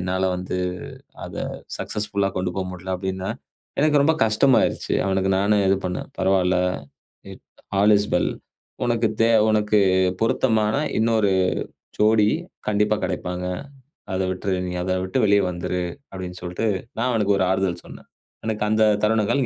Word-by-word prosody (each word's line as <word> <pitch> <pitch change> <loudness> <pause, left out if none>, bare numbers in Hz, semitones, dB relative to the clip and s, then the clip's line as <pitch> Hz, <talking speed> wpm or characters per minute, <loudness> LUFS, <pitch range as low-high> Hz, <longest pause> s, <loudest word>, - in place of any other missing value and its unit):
என்னால 95 +1 -1
வந்து 90 0 -4 0.7
அத - - -8 0.4
சக்சஸ்ஃபுல்லா 100 -2 -2
கொண்டு 90 -1 -1
போ 95 - 0
முடியல 95 +1 -4
அப்படின்னா. 95 0 -3 0.5
எனக்கு 150 -1 +4
ரொம்ப 160 +3 +3
கஷ்டமாயிடுச்சு. 115 +4 +2
அவனுக்கு 95 0 +1
நானும் 100 +1 +2
இது 95 - +4
பண்னேன். 90 - -4
பரவாயில்ல. 95 -1 +2 1.2
All 105 +1 +6
is 105 - -2
well. 90 - +2 0.5
"உனக்கு 120 -1 +1
தே 115 - +5 0.2
உனக்கு 105 0 +2 0.4
பொருத்தமான 110 -1 +2 0.2
இன்னொரு 110 -2 +2 0.7
ஜோடி 105 0 +4 0.4
கண்டிப்பா 105 0 +2
கிடைப்பாங்க. 90 0 -3 0.7
அத 95 - 0
விட்டுரு, 95 +1 -2
நீ 90 - -4
அத 95 +1 0
விட்டு 95 +8 -1
வெளிய 100 0 +4
வந்துரு 90 +1 -3 0.3
அப்படின்னு 90 -1 -7
சொல்லிட்டு, 90 +5 -2 0.3
நான் 125 +3 +1
அவனுக்கு 105 -3 +2
ஒரு 95 - +2
ஆறுதல் 95 -2 -1
சொன்னேன்." - - -13 0.4
எனக்கு 105 -1 -1
அந்த 110 0 +4 0.2
தருணங்கள் 110 +5 +2
100 Hz, 135 wpm, -23 LUFS, 95-110 Hz, 1.2 s, All